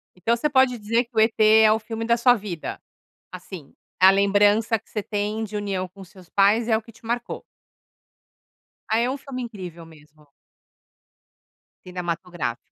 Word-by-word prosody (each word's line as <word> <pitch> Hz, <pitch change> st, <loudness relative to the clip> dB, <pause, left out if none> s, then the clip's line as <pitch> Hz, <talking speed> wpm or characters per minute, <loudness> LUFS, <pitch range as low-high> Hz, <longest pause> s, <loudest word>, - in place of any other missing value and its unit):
Então 225 Hz, +6 st, +1 dB
você 300 Hz, +6 st, -1 dB
pode 260 Hz, -3 st, +3 dB
dizer 230 Hz, +3 st, 0 dB
que 235 Hz, -1 st, -34 dB
o -, -, +3 dB
E.T. 220 Hz, 0 st, +3 dB, 0.2 s
é 215 Hz, -1 st, +6 dB
o 220 Hz, -, +2 dB
filme 225 Hz, +1 st, -5 dB
da 235 Hz, 0 st, +2 dB
sua 245 Hz, +1 st, +5 dB
vida. 195 Hz, -7 st, -6 dB, 0.5 s
Assim, 180 Hz, -4 st, -10 dB, 0.3 s
a 190 Hz, +1 st, +9 dB
lembrança 205 Hz, +3 st, +3 dB
que 225 Hz, -, -28 dB
você 210 Hz, -, -3 dB
tem 210 Hz, +1 st, -2 dB
de 210 Hz, 0 st, -6 dB
união 195 Hz, -3 st, -3 dB
com 195 Hz, +2 st, -14 dB
seus 185 Hz, -1 st, -17 dB
pais 210 Hz, +4 st, +3 dB
é 220 Hz, -, +4 dB
o 220 Hz, -, -4 dB
que 230 Hz, -, -15 dB
te 225 Hz, -, -22 dB
marcou. 235 Hz, +1 st, -4 dB, 1.5 s
Ah, 220 Hz, +1 st, +2 dB
é 245 Hz, +2 st, +1 dB
um 275 Hz, -, -3 dB
filme 265 Hz, -2 st, -7 dB
incrível 180 Hz, -8 st, -8 dB
mesmo. 150 Hz, -1 st, -19 dB, 1.6 s
Cinematográfica. 175 Hz, -7 st, -4 dB
210 Hz, 170 wpm, -23 LUFS, 185-230 Hz, 1.6 s, a